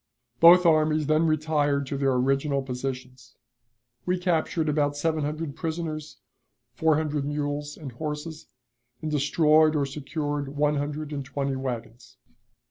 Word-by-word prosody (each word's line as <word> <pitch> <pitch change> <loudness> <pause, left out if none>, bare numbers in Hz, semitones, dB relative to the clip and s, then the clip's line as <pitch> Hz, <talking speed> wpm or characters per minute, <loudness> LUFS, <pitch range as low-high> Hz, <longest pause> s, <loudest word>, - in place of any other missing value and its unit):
Both 175 +2 +8
armies 155 -1 +3
then 155 +2 +2
retired 150 -2 +1
to 135 - -4
their 135 -1 +1
original 135 +2 +1
positions. 130 -2 -6 0.7
We 180 +1 0
captured 170 -2 0
about 145 -1 +1
seven 155 0 0
hundred 150 0 -4
prisoners, 160 -2 -4 0.6
four 160 -1 +2
hundred 150 -2 -1
mules 145 0 -3
and 145 -5 -8
horses, 150 +4 -6 0.6
and 155 - -2
destroyed 155 +2 +3
or 145 -2 +1
secured 145 0 -4
one 150 0 +2
hundred 150 +1 -4
and 140 -1 -3
twenty 135 +1 -3
wagons. 125 -1 -6
150 Hz, 130 wpm, -26 LUFS, 140-155 Hz, 0.7 s, Both